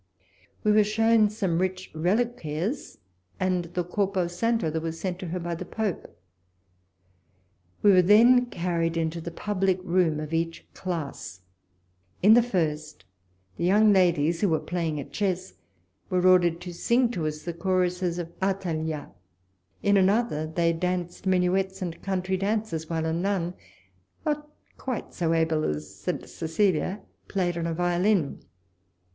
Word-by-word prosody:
We 210 - +4
were 210 0 +6
shown 220 +1 +3
some 195 -6 -1
rich 185 0 -2
reliquaires 190 - -1 0.4
and 185 -2 0
the 175 +1 -3
corpo 190 +1 0
santo 195 +1 0
that 160 +1 -2
was 165 0 -4
sent 185 -2 -3
to 185 - -5
her 180 +2 -3
by 170 0 -3
the 170 - -5
Pope. 190 - -4 1.6
We 205 - +7
were 185 -1 +7
then 235 +6 +6
carried 170 -4 -1
into 165 0 -1
the 170 - -5
public 190 +1 0
room 175 -4 +2
of 155 +1 -6
each 165 0 -2
class. 155 - -5 0.8
In 210 +3 +8
the 240 - +7
first, 155 - -2 0.5
the - - -3
young 205 +4 +5
ladies, 170 -3 +3
who 205 - +3
were 160 -1 +2
playing 160 -1 -2
at 140 - -8
chess, 190 -2 -2 0.6
were 180 0 +1
ordered 175 -2 +5
to 180 -1 -7
sing 235 +7 +2
to 170 -9 -2
us 155 0 -5
the 170 - -4
choruses 180 0 0
of 170 -1 -5
Athaliah; 160 -6 -2 0.7
in 200 0 +4
another, 195 -5 +2
they 165 +1 +1
danced 180 +2 -3
minuets 190 +1 +1
and 175 -4 -5
country 190 -1 -1
dances, 195 -5 -2
while 160 -1 -1
a 160 - 0
nun, 180 0 -1 0.7
not 300 -1 -2 0.3
quite 255 -3 -4
so 165 -2 0
able 160 -1 +1
as 75 0 -3
St. - - -4
Cecilia, 185 +3 0 0.3
played 180 -3 -1
on 170 -1 -2
a 165 - -1
violin. 175 -1 +1
180 Hz, 150 wpm, -26 LUFS, 165-195 Hz, 1.6 s, In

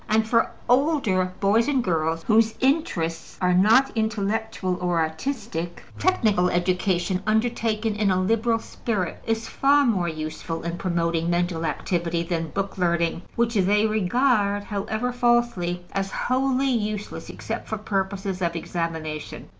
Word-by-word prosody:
And 220 +1 +2
for 230 0 +3 0.2
older 250 - +2
boys 215 +4 +3
and 270 -4 +1
girls 165 -3 0
whose 220 0 +3
interests 195 - 0
are 180 0 +2
not 220 +9 +5
intellectual 220 -3 -1
or 175 -2 +1
artistic, 170 - -3 0.2
technical 215 - +2
education, 180 0 0
undertaken 220 -1 0
in 210 -1 +1
a 185 -1 +2
liberal 225 +4 +2
spirit, 215 -5 -3
is 225 0 -1
far 285 +1 +3
more 195 -8 +1
useful 160 +1 -5
in 170 +1 -4
promoting 170 -2 0
mental 175 -1 0
activity 170 -1 -1
than 165 -2 -2
book 195 +3 -4
learning 170 -1 +1
which 235 0 +1
they 205 +1 +3
regard 215 0 +2
(however 220 +4 -2
falsely) 240 -8 +1
as 195 0 -2
wholly 265 +4 +1
useless 210 -3 -3
except - - -5
for 220 - -2
purposes 195 -2 -2
of 170 -1 0
examination. 160 -2 -4
200 Hz, 135 wpm, -24 LUFS, 175-225 Hz, 0.2 s, not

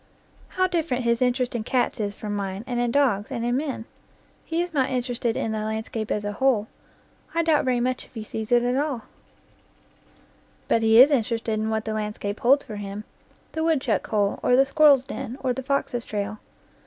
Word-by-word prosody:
How 370 - +4
different 325 -9 -1
his 235 0 +1
interest 250 0 +1
in 235 -2 -2
cats 245 +1 0
is 205 -1 -2
from 210 -1 -4
mine, 195 0 -4
and 245 -2 -2
in 240 0 +1
dogs, 235 -6 +1
and 235 - -2
in 240 +1 +1
men! 270 -5 -3 0.6
He 325 0 -2
is 350 -1 -7
not 265 -3 +1
interested 245 -2 -1
in 225 - -1
the 220 - -2
landscape 220 0 -3
as 210 0 -1
a 205 - -1
whole: 225 -1 +2 0.7
I 335 - +2
doubt 315 -4 +2
very 250 -1 +2
much 255 +1 -1
if - - -25
he 220 - -5
sees 220 +1 -6
it 240 0 +5
at 245 +1 +1
all; 280 -5 -1 1.6
but 230 - +2
he 225 +1 +5
is 270 +4 +9
interested 230 -4 0
hi 220 - -1
what 220 0 -1
the 220 - -2
landscape 210 -1 -3
holds 275 +4 +4
for 215 - -8
him 205 +1 -6 0.5
the 320 - -2
woodchuck 320 -4 +1
hole, 205 -3 0
or 250 - +3
the 270 +2 +5
squir 305 +3 +4
rel's 275 -3 +6
den, 255 -1 -6
or 255 -2 +1
the 265 - -4
fox's 265 -3 -1
trail. 210 0 -4
240 Hz, 205 wpm, -25 LUFS, 215-265 Hz, 1.6 s, is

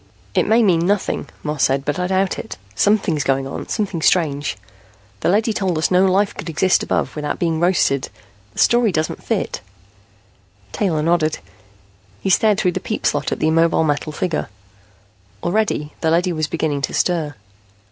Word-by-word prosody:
"It - - +2
may 225 +2 +4
mean 175 -4 +3
nothing," 205 -1 -1
Moss 150 -2 -1
said, 135 +1 0
"but 150 +4 -1
I 180 - 0
doubt 190 0 0
it. - - -7 0.2
Something's 195 - +2
going 135 0 0
on, 135 - -6
something 200 -6 -2
strange. 145 - +1 0.6
The - - 0
leady 215 +4 +2
told 190 -5 -1
us 155 - 0
no 185 +1 +4
life 195 +2 +2
could 165 - -6
exist 180 +4 +2
above - - -1
without 150 -1 -3
being 165 -2 0
roasted. 170 -6 +1 0.4
The - - -22
story 240 -3 +4
doesn't 155 -2 -2
fit." - - -2 1.1
Taylor 160 - 0
nodded. 160 -2 +1 0.8
He 190 - -1
stared 210 +1 +3
through 180 - +2
the - - -3
peep - - -4
slot - - 0
at - - -1
the 155 - +1
immobile 165 0 +3
metal 150 0 -1
figure. 165 +1 -2 0.9
Already 175 -5 0
the 160 - +2
leady 175 +2 +2
was 155 -1 -1
beginning 155 -3 -1
to - - -2
stir. 160 -5 0
170 Hz, 170 wpm, -20 LUFS, 150-190 Hz, 1.1 s, may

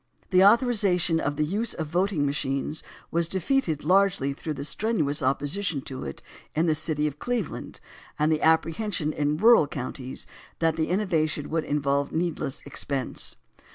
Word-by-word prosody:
The 185 0 +6
authorization 200 -7 +4
of 145 -2 -1
the 150 +1 +1
"Use 210 +8 -1
of 160 - -3
Voting 175 -1 0
Machines" 140 +2 -2 0.3
was 170 0 +2
defeated 185 - 0
largely 180 -5 +3
through 155 +2 -5
the 140 - -5
strenuous 155 -7 0
opposition 145 +5 0
to 130 - -6
it 70 - -7 0.3
in 160 +2 +2
the 160 - +3
city 150 -1 -2
of 150 -1 -3
Cleveland, 245 -8 -3 0.4
and 150 +1 +2
the 155 - +1
apprehension 160 0 +1
in 150 +1 0
rural 225 -5 +6
counties 130 -1 -5 0.3
that 165 -1 +1
the 160 -1 0
innovation 160 -7 0
would 160 -1 0
in 150 - 0
volve 140 0 +1
needless 160 -5 -2
expense. 140 -2 -3
160 Hz, 155 wpm, -26 LUFS, 145-185 Hz, 0.4 s, The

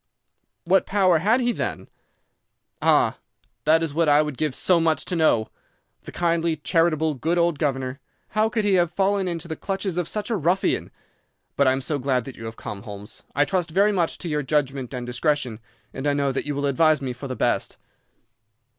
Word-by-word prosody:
"'What 185 +2 +3
power 185 -4 +3
had 220 +9 +3
he, 245 0 +2
then?' - - -4 0.9
"'Ah, - - +3 0.5
that 160 +1 +4
is 160 -3 -2
what 165 0 +2
I 145 +1 +5
would 150 -2 -4
give 150 -1 -1
so 180 -2 +3
much 160 -1 +1
to 180 - -3
know. 155 -9 +2 0.6
The - - -8
kindly, 170 -1 0
charitable, 160 0 +1
good 160 +6 -1
old 170 -3 +2
governor—how 140 +10 -2
could 225 -2 -1
he 205 - +3
have 175 -2 +3
fallen 195 +2 +1
into 170 -1 -4
the 160 - -4
clutches 190 -1 -3
of 175 - -2
such 210 +2 -3
a - - +2
ruffian! 180 +1 0 0.7
But 140 - +3
I - - +5
am 135 - -2
so 145 +2 -2
glad 130 -2 0
that 135 - -8
you 115 - -9
have 115 0 -7
come, 100 -2 -7
Holmes. 105 +1 -9
I 145 +2 +4
trust 180 -2 -1
very 200 +6 +3
much 175 -5 0
to 175 - -6
your 150 -2 0
judgment 135 -3 -1
and 125 -2 -5
discretion, 125 -2 -1 0.3
and 140 - -3
I 145 - +3
know 140 -1 +1
that 135 - -3
you 145 - -2
will 140 0 -1
advise 155 +2 +3
me 130 -3 -4
for 130 +3 -8
the 130 - -4
best. - - 0
155 Hz, 200 wpm, -24 LUFS, 135-175 Hz, 0.9 s, I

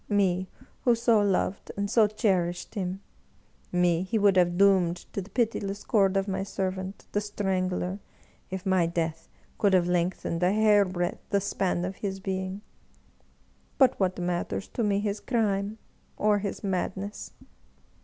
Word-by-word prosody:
Me, 190 -3 +1 0.3
who 240 -2 +4
so 230 -2 +3
loved 195 -1 0
and 200 0 0
so 215 +1 +4
cherished 185 -5 0
him 190 -2 -3 0.4
— - - -35
^me 180 -1 +2
he 220 +4 -1
would 200 -2 +4
have 175 -1 +3
doomed 190 -3 +4 0.2
to 200 - -2
the 190 - -11
pitiless 205 -4 -1
cord 195 -3 +3
of 195 +1 0
my 190 -1 -1
servant, 190 0 -4
the 205 - 0
Strangler, 190 -2 -2 0.5
if 190 -1 -5
my 185 -3 +3
death 165 -1 -3 0.3
could 200 -2 +3
have 175 -1 +3
lengthened 175 -1 -1
a 180 +1 +4
hairbreadth 200 -5 +2
the 200 - +2
span 185 -2 -1
of 185 +1 -5
his 195 -2 -4
being. 190 0 -3 1.2
But 265 -2 +4
what 185 -2 +1
matters 180 +2 -2
to 235 - -2
me 200 -1 +1
his 205 0 -2
crime 210 -3 0 0.4
or 210 -1 +3
his 200 -1 -4
madness 195 +1 -3
195 Hz, 155 wpm, -27 LUFS, 180-205 Hz, 1.2 s, who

